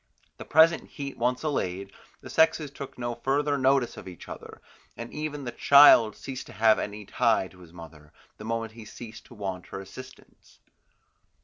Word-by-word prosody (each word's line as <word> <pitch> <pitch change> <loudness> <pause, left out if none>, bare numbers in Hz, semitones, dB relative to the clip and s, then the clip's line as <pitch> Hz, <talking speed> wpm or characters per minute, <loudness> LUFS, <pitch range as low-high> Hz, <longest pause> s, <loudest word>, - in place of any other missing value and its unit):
The - - -9
present 160 +2 +4
heat 140 -2 -7
once 125 +3 0
allayed, 100 - -3 0.3
the - - -11
sexes 160 -2 +2
took 135 -1 -9
no 120 -1 -3
further 140 +4 0
notice 135 -2 +1
of - - -10
each 90 -3 -11
other, - - -10 0.4
and 115 0 -8
even 150 -1 -5
the 120 - -5
child 140 -7 +7
ceased 135 -1 -8
to - - -12
have 110 0 +4
any 105 0 -6
tie 115 -2 +1
in 90 - -18
his 85 -3 -15
mother, 80 -3 -13 0.3
the - - -10
moment 115 0 -3
he 115 0 -12
ceased 110 +1 -11
to 120 - -15
want 95 -3 -5
her - - -7
assistance. 130 +7 -13
120 Hz, 180 wpm, -27 LUFS, 105-140 Hz, 0.4 s, child